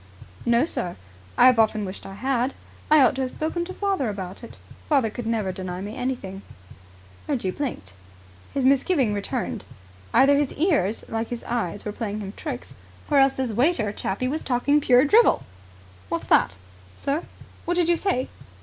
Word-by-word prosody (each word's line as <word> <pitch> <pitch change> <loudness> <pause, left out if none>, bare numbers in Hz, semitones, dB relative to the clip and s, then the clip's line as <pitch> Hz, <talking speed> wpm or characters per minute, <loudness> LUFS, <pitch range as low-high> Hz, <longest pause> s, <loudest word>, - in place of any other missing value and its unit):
"No, 235 +4 +4
sir. 180 - -3 0.4
I - - +7
have 255 -2 +6
often 215 -1 +2
wished 190 0 -7
I 195 - -9
had. 255 +3 0 0.3
I 305 -1 +7
ought 255 - +5
to - - 0
have 260 - -1
spoken 320 +5 -2
to 375 - -7
father 390 - 0
about 195 0 -6
it. 235 - -10 0.3
Father 265 -8 +3
could 235 +1 -6
never 220 -4 0
deny 185 -1 -5
me 205 +3 -6
anything." 195 -7 -4 0.9
Reggie 240 -10 -1
blinked. 185 - -5 0.6
His 270 -2 -1
misgiving 270 - +3
returned. 200 -1 -3 0.5
Either 280 +1 +5
his 290 -2 0
ears, 285 - +1
like 225 0 -2
his 240 -1 -6
eyes, 215 -6 -3
were 210 - -2
playing 210 -1 -4
him 200 -1 -6
tricks, 270 -6 -6 0.4
or 285 - +5
else 270 0 +4
this 255 -4 -2
waiter 240 -3 +2
chappie 205 +5 -2
was 305 +5 -2
talking 285 +4 +2
pure 255 0 +5
drivel. 440 +10 +5 0.7
"What's - - -3
that?" 90 - +4 0.4
"Sir?" 280 +4 -1 0.4
"What 350 - 0
did 350 -2 +3
you 345 - +4
say?" 330 -8 0
250 Hz, 175 wpm, -24 LUFS, 210-285 Hz, 0.9 s, I